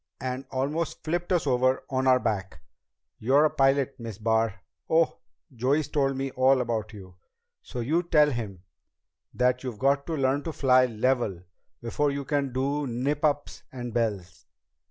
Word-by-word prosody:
And 130 Hz, +2 st, -4 dB
almost 145 Hz, +5 st, -2 dB
flipped 175 Hz, +3 st, -2 dB
us 175 Hz, -4 st, +2 dB
over 130 Hz, -1 st, +2 dB
on 130 Hz, 0 st, 0 dB
our 130 Hz, -1 st, +5 dB
back. 95 Hz, -9 st, -3 dB, 0.6 s
You're 135 Hz, +7 st, +4 dB
a 155 Hz, -, +2 dB
pilot, 135 Hz, 0 st, +2 dB
Miss 115 Hz, -4 st, -7 dB
Barr 110 Hz, -3 st, 0 dB, 0.3 s
oh, 165 Hz, 0 st, +2 dB, 0.4 s
Joey's 135 Hz, +6 st, +1 dB
told 135 Hz, -2 st, 0 dB
me 135 Hz, 0 st, -2 dB
all 130 Hz, +1 st, +3 dB
about 115 Hz, -3 st, -2 dB
you 95 Hz, -4 st, -12 dB, 0.4 s
so 125 Hz, -, -6 dB
you 155 Hz, +9 st, +1 dB
tell 150 Hz, -4 st, +3 dB
him 105 Hz, -8 st, -5 dB, 0.7 s
that 125 Hz, +1 st, +1 dB
you've 125 Hz, -4 st, -5 dB
got 140 Hz, +2 st, +1 dB
to 165 Hz, -2 st, -2 dB
learn 135 Hz, +1 st, +1 dB
to 165 Hz, -, -3 dB
fly 130 Hz, -2 st, +4 dB
level 115 Hz, -5 st, 0 dB, 0.4 s
before 145 Hz, +5 st, 0 dB
you 140 Hz, 0 st, -3 dB
can 140 Hz, -1 st, -1 dB
do 140 Hz, +3 st, -1 dB
nip 135 Hz, +5 st, -2 dB
ups 145 Hz, -1 st, 0 dB
and 120 Hz, -3 st, -6 dB
bells. 100 Hz, -7 st, -3 dB
130 Hz, 160 wpm, -27 LUFS, 115-140 Hz, 0.7 s, our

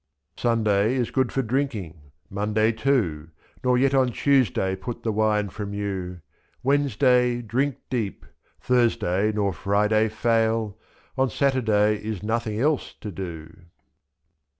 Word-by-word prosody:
Sunday 110 Hz, -1 st, +1 dB
is 125 Hz, -3 st, -1 dB
good 130 Hz, -2 st, +1 dB
for 135 Hz, -, 0 dB
drinking, 110 Hz, -, -3 dB, 0.2 s
Monday 105 Hz, +3 st, +1 dB
too. 110 Hz, -, 0 dB, 0.3 s
Nor 125 Hz, -1 st, +3 dB
yet 135 Hz, +2 st, +2 dB
on 130 Hz, -2 st, +3 dB
Tuesday 115 Hz, -8 st, +2 dB
put 120 Hz, +5 st, -7 dB
the 115 Hz, -, 0 dB
wine 105 Hz, -1 st, +1 dB
from 100 Hz, +1 st, -6 dB
you, 95 Hz, -3 st, -4 dB, 0.4 s
227.Wednesday 125 Hz, -3 st, +2 dB
drink 130 Hz, +5 st, 0 dB, 0.2 s
deep, 115 Hz, -6 st, -3 dB, 0.3 s
Thursday 110 Hz, -5 st, +1 dB
nor 100 Hz, -2 st, 0 dB
Friday 105 Hz, +5 st, +1 dB
fail 110 Hz, -1 st, 0 dB, 0.2 s
— -, -, -32 dB
On 130 Hz, 0 st, +3 dB
Saturday 110 Hz, -6 st, +1 dB
is 105 Hz, -3 st, -4 dB
nothing 110 Hz, -1 st, -1 dB
else 150 Hz, +2 st, 0 dB
to 105 Hz, -, -6 dB
do. 85 Hz, -4 st, -6 dB
110 Hz, 125 wpm, -24 LUFS, 100-125 Hz, 0.4 s, Nor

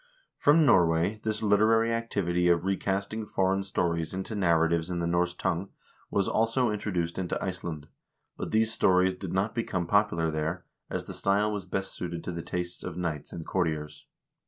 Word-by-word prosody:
From 150 Hz, +2 st, +5 dB
Norway 90 Hz, -2 st, +3 dB
this 110 Hz, 0 st, -2 dB
literary 110 Hz, +2 st, +4 dB
activity 90 Hz, -7 st, 0 dB
of 85 Hz, 0 st, +3 dB
recasting 100 Hz, +3 st, -1 dB
foreign 95 Hz, 0 st, +1 dB
stories 85 Hz, -3 st, -1 dB
into 95 Hz, +4 st, -4 dB
narratives 85 Hz, -3 st, +2 dB
in 90 Hz, -, -2 dB
the 85 Hz, -, -1 dB
Norse 90 Hz, +1 st, +1 dB
tongue 90 Hz, +2 st, -2 dB, 0.4 s
was 100 Hz, -, +1 dB
also 115 Hz, +1 st, +2 dB
introduced 90 Hz, -5 st, -2 dB
into 90 Hz, -2 st, -2 dB
Iceland, 85 Hz, -5 st, -4 dB, 0.5 s
but -, -, -5 dB
these 110 Hz, +1 st, +2 dB
stories 95 Hz, -2 st, +3 dB
did 95 Hz, -1 st, -6 dB
not 100 Hz, +4 st, 0 dB
become 95 Hz, -7 st, -2 dB
popular 85 Hz, -4 st, +2 dB
there, 80 Hz, +3 st, -3 dB, 0.2 s
as -, -, -3 dB
the -, -, -7 dB
style 100 Hz, +2 st, +1 dB
was 100 Hz, -3 st, -4 dB
best 95 Hz, +1 st, -3 dB
suited 85 Hz, -1 st, -5 dB
to -, -, -4 dB
the 85 Hz, -1 st, -4 dB
tastes 90 Hz, +1 st, -4 dB
of 90 Hz, -2 st, -6 dB
knights 80 Hz, -5 st, -3 dB
and 80 Hz, -, -7 dB
courtiers. 75 Hz, -4 st, -2 dB
95 Hz, 170 wpm, -28 LUFS, 85-105 Hz, 0.5 s, From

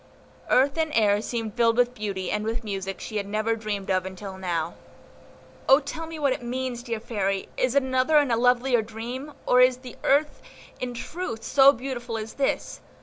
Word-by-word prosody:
Earth 275 Hz, +4 st, +3 dB
and 315 Hz, -1 st, +1 dB
air 210 Hz, -2 st, +4 dB
seemed 225 Hz, -2 st, -3 dB
filled 230 Hz, -1 st, +3 dB
with 245 Hz, 0 st, +3 dB
beauty 200 Hz, -5 st, -3 dB
and 210 Hz, 0 st, -1 dB
with 225 Hz, +2 st, -2 dB
music 195 Hz, -2 st, -4 dB
she 215 Hz, -, -5 dB
had 200 Hz, -1 st, -2 dB
never 215 Hz, +2 st, 0 dB
dreamed 205 Hz, -3 st, -3 dB
of 185 Hz, -1 st, +2 dB
until 190 Hz, +1 st, -7 dB
now. 170 Hz, -3 st, -2 dB, 1.0 s
"O 270 Hz, +2 st, +8 dB
tell 310 Hz, +3 st, -6 dB
me 325 Hz, 0 st, -7 dB
what 280 Hz, -3 st, +2 dB
it -, -, -6 dB
means, 245 Hz, 0 st, -3 dB
dear 235 Hz, -3 st, -4 dB
Fairy! 195 Hz, -4 st, -2 dB
is 255 Hz, +1 st, 0 dB
it 280 Hz, -, +4 dB
another 260 Hz, +4 st, +2 dB
and 290 Hz, -4 st, +3 dB
a -, -, +4 dB
lovelier 245 Hz, +1 st, +3 dB
dream, 240 Hz, +6 st, -7 dB
or 250 Hz, -, +5 dB
is 255 Hz, 0 st, +5 dB
the 255 Hz, -1 st, -11 dB
earth 290 Hz, +2 st, +2 dB, 0.4 s
in 250 Hz, -1 st, -4 dB
truth 235 Hz, -3 st, -5 dB
so 275 Hz, 0 st, +6 dB
beautiful 245 Hz, -3 st, -5 dB
as 220 Hz, 0 st, -6 dB
this?" 275 Hz, -, -1 dB
240 Hz, 195 wpm, -25 LUFS, 215-260 Hz, 1.0 s, O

